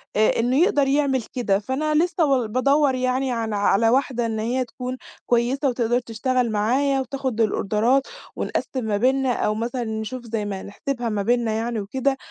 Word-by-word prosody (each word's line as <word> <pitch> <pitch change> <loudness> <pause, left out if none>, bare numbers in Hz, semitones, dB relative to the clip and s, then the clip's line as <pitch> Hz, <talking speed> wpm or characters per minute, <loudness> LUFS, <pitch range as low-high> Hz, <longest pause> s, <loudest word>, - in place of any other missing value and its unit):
آآ، 215 +2 +3
إنه 245 +3 +2
يقدَر 320 -8 +3
يعمل 270 -3 +1
كده، 205 -6 +1
فأنا 295 +8 -1
لسه 350 -2 +1
و 260 -5 +1
بادوّر 275 +4 +2
يعني 255 +1 0
على 225 -3 -2
على 205 +2 +3
واحدة 250 -1 +1
إن 220 -1 -2
هي 245 +4 -1
تكون 250 +1 -6 0.3
كويسة 250 +4 +1
وتقدَر 240 0 +1
تشتغل 240 +1 -1
معايا, 265 +6 +1
وتاخُد 260 -3 -2
الأوردرات 225 +5 +1 0.3
ونقسّم 260 -3 -3
ما 210 -2 0
بيننا 260 +2 +2
أو 215 -2 0
مثلًا 240 +2 -2
نشوف 220 +3 -5
زي 220 -2 -3
ما 195 -2 -4
نحسِبها 240 +3 -4
ما 210 -2 -1
بيننا 235 0 +1
يعني 225 +1 -2
وكده، 265 +7 -1
245 Hz, 170 wpm, -23 LUFS, 220-265 Hz, 0.3 s, آآ